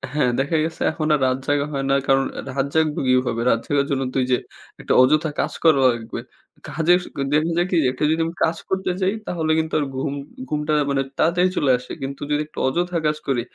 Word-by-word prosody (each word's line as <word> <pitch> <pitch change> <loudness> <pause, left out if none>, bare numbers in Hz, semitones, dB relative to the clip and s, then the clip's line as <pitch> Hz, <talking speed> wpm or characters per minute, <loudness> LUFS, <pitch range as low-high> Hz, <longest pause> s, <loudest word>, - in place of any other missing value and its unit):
হ্যাঁ। 125 -5 +2
দেখা 145 +4 +1
গেছে 160 0 -5
এখন 155 -1 -3
আর 150 - +2
রাত 130 0 +1
জাগা 145 0 +1
হয় 135 - -2
না। 135 - +4
কারণ 135 0 +3
আ - - -3
রাত 135 +1 -1
জাগবো 155 -2 +2
কিভাবে? 125 -2 +2
রাত 115 - +3
জাগার 140 -1 +1
জন্য 135 -1 0
তো - - -2
ঐযে 125 0 +2 0.4
১ - - -12
টা - - +4
অযথা 155 +4 +3
কাজ - - -1
করা 155 -4 +5
লাগবে। 115 0 -5 0.5
কাজের 165 +4 +3 0.3
দেখা 155 +3 +2
যায় 175 +1 +2
কি? 180 - +2
১ 125 - -5
টা - - 0
যদি 160 - +1
আমি 165 - -5
কাজ 165 +1 +1
করতে 190 -1 0
যাই, 190 +1 +2
তাহলে 160 -3 -1
কিন্তু 160 0 -3
আর 145 - 0
ঘুম 140 +2 -2 0.4
ঘুমটা 150 0 -1 0.2
মানে 140 -1 +1 0.2
তাড়াতাড়ি 175 +3 +3
চলে 135 - +3
আসে। 125 - -11
কিন্তু 135 +1 -5
যদি 150 0 +2
একটু - - -26
অযথা 175 +5 0
কাজ 150 0 +1
করি, 125 -3 +1
150 Hz, 225 wpm, -22 LUFS, 135-160 Hz, 0.5 s, করা